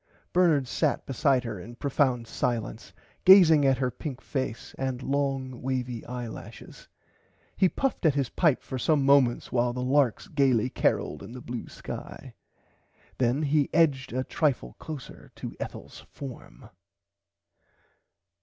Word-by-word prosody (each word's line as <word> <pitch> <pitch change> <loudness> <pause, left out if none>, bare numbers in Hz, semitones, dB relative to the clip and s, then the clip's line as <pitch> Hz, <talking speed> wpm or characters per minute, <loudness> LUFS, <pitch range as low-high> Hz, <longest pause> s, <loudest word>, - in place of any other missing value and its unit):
Bernard 165 -7 +3
sat 150 +3 0
beside 135 -1 +2
her 115 -5 -5
in 115 +7 -10
profound 130 -3 0
silence 115 -2 -3 0.3
gazing 165 -7 +8
at 135 -1 +3
her 130 -1 0
pink 130 +2 -6
face 130 -4 -4
and 130 -1 -2
long 135 -3 -2
wavy 125 -3 -3
eye 120 0 -5
lashes. 110 - -11 0.7
He 190 -2 +4
puffed 270 +2 -2
at 145 - +2
his 140 -3 +1
pipe 155 -7 +2
for 130 - -5
some 145 0 +2
moments 135 -3 +3
while 120 0 +1
the 125 0 -3
larks 130 -2 +2
gaily 130 -5 +2
caroled 75 - 0
in 115 - -9
the 125 - -7
blue 120 -1 -6
sky. - - -8 0.9
Then 130 +4 +1
he 150 -1 +2
edged 145 -6 +2
a 130 +2 -1
trifle 130 - -1
closer 155 -5 -9
to - - -7
Ethels - - -8
form. 135 -4 -10
130 Hz, 140 wpm, -27 LUFS, 125-145 Hz, 0.9 s, gazing